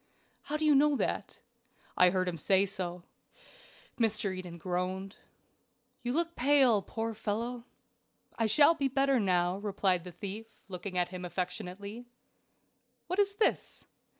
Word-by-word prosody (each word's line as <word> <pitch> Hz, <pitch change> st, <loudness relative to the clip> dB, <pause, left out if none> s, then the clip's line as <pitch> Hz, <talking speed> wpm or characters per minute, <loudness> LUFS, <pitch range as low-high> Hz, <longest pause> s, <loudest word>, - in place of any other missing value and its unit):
"How 300 Hz, -, -2 dB
do 310 Hz, -, -1 dB
you 300 Hz, -, +6 dB
know 290 Hz, +1 st, +4 dB
that?" -, -, -2 dB, 0.6 s
"I 180 Hz, -, +6 dB
heard 185 Hz, 0 st, 0 dB
him 170 Hz, -2 st, -3 dB
say 190 Hz, +4 st, +3 dB
so." 180 Hz, -2 st, -5 dB, 1.0 s
Mr. 215 Hz, -4 st, +1 dB
Eden 180 Hz, -2 st, -7 dB
groaned. 185 Hz, +3 st, -3 dB, 0.8 s
"You 245 Hz, -, -2 dB
look 335 Hz, +4 st, 0 dB
pale, 260 Hz, -5 st, +4 dB
my -, -, -21 dB
poor 225 Hz, 0 st, -2 dB
fellow." 230 Hz, +3 st, -3 dB, 0.7 s
"I 225 Hz, -, +1 dB
shall 295 Hz, +8 st, +6 dB
be 285 Hz, -4 st, 0 dB
better 270 Hz, 0 st, +2 dB
now," 180 Hz, -2 st, +1 dB
replied 195 Hz, -3 st, 0 dB
the 180 Hz, -, -8 dB
thief, 205 Hz, +5 st, -7 dB
looking 185 Hz, 0 st, -5 dB
at 175 Hz, -1 st, +1 dB
him 185 Hz, 0 st, -7 dB
affectionately. 185 Hz, +5 st, -5 dB, 1.0 s
"What 365 Hz, +3 st, -2 dB
is 400 Hz, -1 st, +2 dB
this?" 430 Hz, -, 0 dB
205 Hz, 145 wpm, -31 LUFS, 180-255 Hz, 1.0 s, you